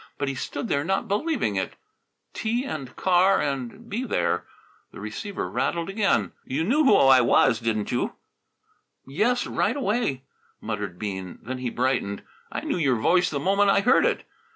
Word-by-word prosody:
But 140 Hz, -1 st, -1 dB
he -, -, -2 dB
stood 140 Hz, +2 st, -4 dB
there 140 Hz, -, 0 dB
not 195 Hz, +4 st, -1 dB
believing 210 Hz, -, 0 dB
it 95 Hz, -, -2 dB, 0.6 s
tea 235 Hz, +4 st, -1 dB
and 135 Hz, -, -6 dB
car 185 Hz, +1 st, +3 dB
and 140 Hz, -, -3 dB
be 235 Hz, +5 st, -3 dB
there -, -, -1 dB, 0.4 s
The -, -, -11 dB
receiver 205 Hz, -3 st, -5 dB
rattled 170 Hz, 0 st, -1 dB
again. 195 Hz, -, +1 dB
"You 140 Hz, +5 st, -2 dB
knew 280 Hz, -, +2 dB
who 240 Hz, -, +6 dB
I 135 Hz, -1 st, +6 dB
was, 115 Hz, -1 st, +4 dB
didn't 110 Hz, -3 st, -1 dB
you?" -, -, -1 dB, 0.9 s
"Yes, 225 Hz, -, +1 dB
right -, -, 0 dB
away," 210 Hz, -, -1 dB, 0.4 s
muttered 105 Hz, -5 st, -4 dB
Bean. 95 Hz, -2 st, -5 dB
Then 130 Hz, +2 st, -5 dB
he 125 Hz, -1 st, -2 dB
brightened. 125 Hz, -6 st, -1 dB, 0.3 s
"I -, -, -3 dB
knew -, -, -2 dB
your 140 Hz, -7 st, +2 dB
voice 175 Hz, +11 st, +3 dB
the 145 Hz, -, -2 dB
moment 200 Hz, +5 st, +3 dB
I 195 Hz, -, +4 dB
heard 240 Hz, -, +4 dB
it." -, -, -2 dB
145 Hz, 170 wpm, -25 LUFS, 125-205 Hz, 0.9 s, who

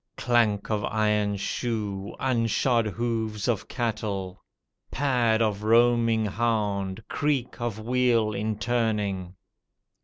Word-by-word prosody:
Clank 115 Hz, -4 st, +1 dB
of 105 Hz, -1 st, 0 dB
iron 105 Hz, -1 st, +1 dB
shoe, 100 Hz, -2 st, -3 dB
unshod 120 Hz, -1 st, +1 dB
hooves 110 Hz, -1 st, -2 dB
of 115 Hz, -5 st, -1 dB
cattle. 105 Hz, -6 st, -3 dB, 0.5 s
Pad 120 Hz, -5 st, +2 dB
of 105 Hz, -2 st, -1 dB
roaming 115 Hz, 0 st, +3 dB
hound, 105 Hz, -2 st, -1 dB
creak 140 Hz, -5 st, -1 dB
of 115 Hz, -3 st, -2 dB
wheel 115 Hz, -2 st, +2 dB
in 105 Hz, +1 st, -2 dB
turning. 105 Hz, -5 st, -1 dB
110 Hz, 100 wpm, -26 LUFS, 105-120 Hz, 0.5 s, roaming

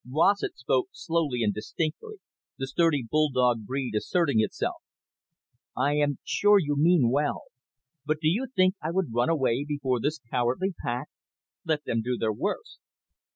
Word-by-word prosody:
Rossett 170 Hz, +8 st, +2 dB
spoke 125 Hz, 0 st, 0 dB
slowly 160 Hz, -8 st, -1 dB
and 105 Hz, -2 st, +1 dB
distinctly, 165 Hz, -, -4 dB, 0.4 s
the 135 Hz, -, -3 dB
sturdy 145 Hz, -1 st, +1 dB
bulldog 125 Hz, -6 st, +2 dB
breed 130 Hz, -2 st, -3 dB
asserting 140 Hz, +2 st, +1 dB
itself. 110 Hz, -, -2 dB, 1.0 s
"I 140 Hz, +3 st, +2 dB
am 145 Hz, -1 st, +1 dB
sure 205 Hz, 0 st, +4 dB
you 145 Hz, -6 st, 0 dB
mean 150 Hz, -5 st, +4 dB
well. 145 Hz, +2 st, 0 dB, 0.6 s
But 155 Hz, +1 st, 0 dB
do 155 Hz, -, 0 dB
you 220 Hz, +12 st, +1 dB
think 185 Hz, 0 st, +4 dB
I 155 Hz, -, -2 dB
would 170 Hz, -8 st, -1 dB
run 120 Hz, +4 st, +2 dB
away 135 Hz, -5 st, +1 dB
before 145 Hz, -4 st, -1 dB
this 150 Hz, +6 st, -1 dB
cowardly 130 Hz, +10 st, 0 dB
pack? 125 Hz, +4 st, -3 dB, 0.6 s
Let 155 Hz, -2 st, 0 dB
them 115 Hz, -, -1 dB
do 125 Hz, +2 st, -2 dB
their 110 Hz, -1 st, 0 dB
worst." -, -, -4 dB
145 Hz, 155 wpm, -27 LUFS, 125-165 Hz, 1.0 s, sure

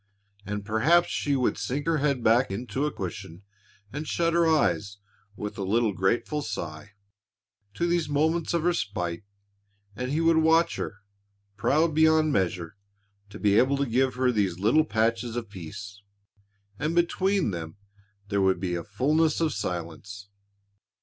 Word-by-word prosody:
And 105 Hz, 0 st, -4 dB
perhaps 140 Hz, +12 st, +3 dB
she 145 Hz, -1 st, 0 dB
would 130 Hz, -2 st, 0 dB
sink 140 Hz, +3 st, -3 dB
her 165 Hz, -2 st, +1 dB
head 140 Hz, -4 st, 0 dB
back 120 Hz, +4 st, +4 dB
into 125 Hz, +8 st, -2 dB
a -, -, -3 dB
cushion 95 Hz, -2 st, -7 dB, 0.5 s
and 150 Hz, +2 st, -5 dB
shut 170 Hz, -1 st, 0 dB
her 170 Hz, -1 st, +3 dB
eyes 100 Hz, -, +1 dB, 0.4 s
with 105 Hz, +1 st, -6 dB
a -, -, -2 dB
little 110 Hz, +2 st, +1 dB
grateful 105 Hz, -, 0 dB
sigh 100 Hz, -, -6 dB, 0.8 s
to 170 Hz, -, 0 dB
these 170 Hz, -3 st, 0 dB
moments 160 Hz, +4 st, +1 dB
of 170 Hz, -, 0 dB
respite, 100 Hz, -, -1 dB, 0.7 s
and 125 Hz, +2 st, -4 dB
he 150 Hz, +4 st, 0 dB
would 165 Hz, 0 st, +4 dB
watch 160 Hz, +1 st, +3 dB
her, 105 Hz, -2 st, -5 dB, 0.5 s
proud 155 Hz, +9 st, +2 dB
beyond 160 Hz, -1 st, +4 dB
measure 90 Hz, -2 st, -1 dB, 0.5 s
to 100 Hz, -, -9 dB
be 105 Hz, 0 st, +3 dB
able 135 Hz, +2 st, +3 dB
to 140 Hz, -, 0 dB
give 130 Hz, +2 st, +1 dB
her 125 Hz, 0 st, +2 dB
these 100 Hz, -6 st, 0 dB
little 115 Hz, +11 st, +3 dB
patches 115 Hz, -1 st, 0 dB
of 115 Hz, -4 st, -5 dB
peace. 100 Hz, +3 st, -9 dB, 0.8 s
And 155 Hz, +3 st, -1 dB
between 180 Hz, -, +1 dB
them 85 Hz, +1 st, -6 dB, 0.5 s
there 100 Hz, -1 st, +1 dB
would 95 Hz, -2 st, +2 dB
be 90 Hz, -1 st, -2 dB
a 85 Hz, -1 st, -3 dB
fullness 150 Hz, +10 st, +1 dB
of 160 Hz, -3 st, +1 dB
silence. 100 Hz, +2 st, -5 dB
120 Hz, 155 wpm, -26 LUFS, 100-155 Hz, 0.8 s, back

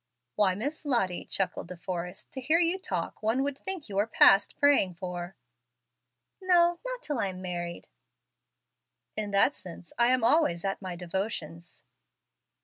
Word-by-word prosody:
"Why, 190 Hz, -3 st, +3 dB
Miss 285 Hz, +11 st, -4 dB
Lottie," 235 Hz, -, 0 dB
chuckled 195 Hz, -3 st, -1 dB
De 180 Hz, 0 st, -8 dB
Forrest, 180 Hz, +1 st, -6 dB
"to 265 Hz, -, -5 dB
hear 310 Hz, +6 st, +3 dB
you 350 Hz, +2 st, +2 dB
talk, -, -, -4 dB
one 225 Hz, +5 st, +1 dB
would 285 Hz, -1 st, -2 dB
think 380 Hz, -5 st, -2 dB
you 200 Hz, -2 st, -5 dB
were 205 Hz, +2 st, +2 dB
past 200 Hz, -3 st, +5 dB
praying 285 Hz, -11 st, +3 dB
for." 175 Hz, 0 st, -6 dB, 1.1 s
"No, 345 Hz, -2 st, +4 dB
not -, -, -4 dB
till 295 Hz, -, -2 dB
I 200 Hz, -, +1 dB
am 185 Hz, -1 st, -6 dB
married." 175 Hz, -2 st, -5 dB, 1.3 s
"In 215 Hz, -1 st, -3 dB
that 200 Hz, +8 st, +3 dB
sense 175 Hz, -, -10 dB
I 235 Hz, -, +5 dB
am 255 Hz, -1 st, +2 dB
always 230 Hz, -, +3 dB
at 195 Hz, +1 st, -2 dB
my 185 Hz, -2 st, -5 dB
devotions." 175 Hz, -2 st, -5 dB
200 Hz, 155 wpm, -28 LUFS, 180-285 Hz, 1.3 s, past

